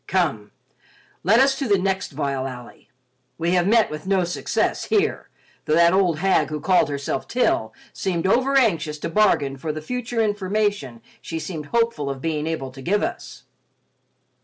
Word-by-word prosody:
Come, 155 - 0 0.7
let 215 +6 +4
us 270 +1 +5
to 275 - -1
the 200 -2 +4
next 190 0 -1
vile 135 -2 -2
alley. 125 -2 -11 0.5
We 170 +1 0
have 180 0 +2
met 225 +1 +3
with 150 +4 -7
no 190 -2 +2
success 175 0 -1
here, 425 0 0 0.4
though 155 - +2
that 170 +1 +5
old 185 -4 +2
hag 165 -4 +2
who 155 0 -4
called 180 +1 +3
herself 140 -1 -3
Til 110 - +1 0.2
seemed 175 -3 -2
overanxious 225 - +2
to 150 - -4
bargain 155 -8 +2
for 155 +3 -3
the 155 - -5
future 245 +7 -4
information 205 - -1 0.2
she 165 - -5
seemed 160 -2 -6
hopeful 230 -11 0
of 135 -1 -4
being 155 +1 -2
able 145 -5 -3
to 135 +1 -11
give 205 +9 0
us." - - -5
175 Hz, 165 wpm, -22 LUFS, 150-205 Hz, 0.7 s, us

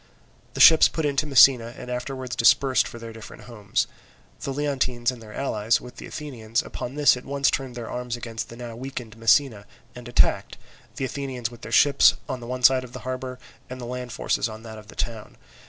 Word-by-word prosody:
The - - -5
ships 160 -1 +8
put 160 - -3
in 145 -1 0
to 150 +1 +1
Messina, 125 -4 +5
and 125 0 -8
afterwards 125 +1 -4
dispersed 130 +2 +4
for - - -9
their 115 -1 -9
different 110 -1 -11
homes. 105 -5 -2 0.5
The 135 - -4
Leontines 130 -4 -1
and 125 -2 -11
their 110 -1 -12
allies, 115 -3 0
with 125 - -12
the - - -8
Athenians, 120 -6 -3
upon 125 +3 -7
this 145 -2 +5
at 125 - -9
once 140 0 +1
turned 130 -3 -3
their 120 -2 -6
arms 125 -1 -4
against 115 -2 -6
the 115 - -11
now 120 -2 -7
weakened 125 -3 -7
Messina, 115 -2 +2 0.3
and 125 0 -10
attacked, 120 - +1 0.4
the 135 - -2
Athenians 130 -3 -4
with 120 - -14
their 110 - -9
ships 140 +6 +5
on 130 - -4
the 125 +2 -5
side 130 +1 +6
of 125 -1 -12
the 130 - -8
harbour, 130 0 -4 0.3
and 130 0 -7
the 120 - -6
land 125 0 -6
forces 115 - -1
on 110 +1 -10
that 110 -1 -9
of 105 - -15
the - - -13
town. 115 -2 -5
125 Hz, 210 wpm, -24 LUFS, 115-130 Hz, 0.5 s, ships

